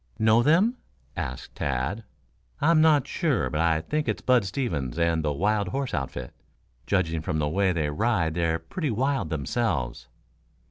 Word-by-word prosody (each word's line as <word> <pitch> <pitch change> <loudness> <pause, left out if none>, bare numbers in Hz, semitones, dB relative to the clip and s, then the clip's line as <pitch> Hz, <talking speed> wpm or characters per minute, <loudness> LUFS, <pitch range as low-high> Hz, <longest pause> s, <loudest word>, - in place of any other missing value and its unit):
"Know 110 +1 +4
them?" 185 - +3 0.4
asked 65 +1 -5
Tad. 70 - -2 0.6
"I'm 155 +2 +4
not 155 -4 +5
sure, 155 - 0
but 75 0 0
I 80 -1 +2
think 150 - -2
it's - - -2
Bud 125 -3 +4
Stevens 85 - -3
and 85 -1 +1
the 75 - 0
wild 100 +6 0
horse 135 +7 -3
outfit. 65 -4 -4 0.5
Judging 85 -5 0
from 80 0 -2
the 75 -1 0
way 95 +5 +2
they 80 -4 -1
ride 90 -2 +1
they're 85 -1 +1
pretty 145 - -4
wild 130 - 0
themselves." 70 - -2
90 Hz, 155 wpm, -26 LUFS, 75-125 Hz, 0.6 s, not